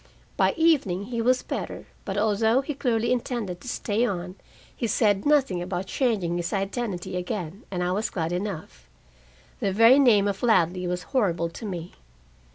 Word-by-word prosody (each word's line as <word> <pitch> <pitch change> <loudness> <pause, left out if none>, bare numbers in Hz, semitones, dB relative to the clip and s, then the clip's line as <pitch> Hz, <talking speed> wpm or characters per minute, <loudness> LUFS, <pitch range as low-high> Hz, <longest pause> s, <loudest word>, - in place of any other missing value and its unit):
By - - +2
evening 280 - +2
he 230 - 0
was 255 +2 +2
better, - - -5 0.2
but 195 -1 -3
although 220 +4 +3
he 295 +2 -4
clearly 235 -4 0
intended 235 -7 -2
to - - -11
stay 225 -2 -1
on, 180 -6 -2 0.4
he 235 - -2
said 205 0 +2
nothing 270 -12 +3
about 180 +1 -3
changing 195 -8 0
his 170 -1 -3
identity 195 -2 -3
again, 180 +1 -4
and 180 -2 -2
I 180 - 0
was 210 +4 -1
glad 165 -2 -2
enough. 175 - -5 0.7
The 195 - 0
very 230 +7 +6
name 215 -7 +5
of 200 -1 -2
Ladley 180 -5 +2
was 180 0 -2
horrible 175 -9 +1
to 220 - -9
me. 175 -3 -5
200 Hz, 165 wpm, -25 LUFS, 180-235 Hz, 0.7 s, very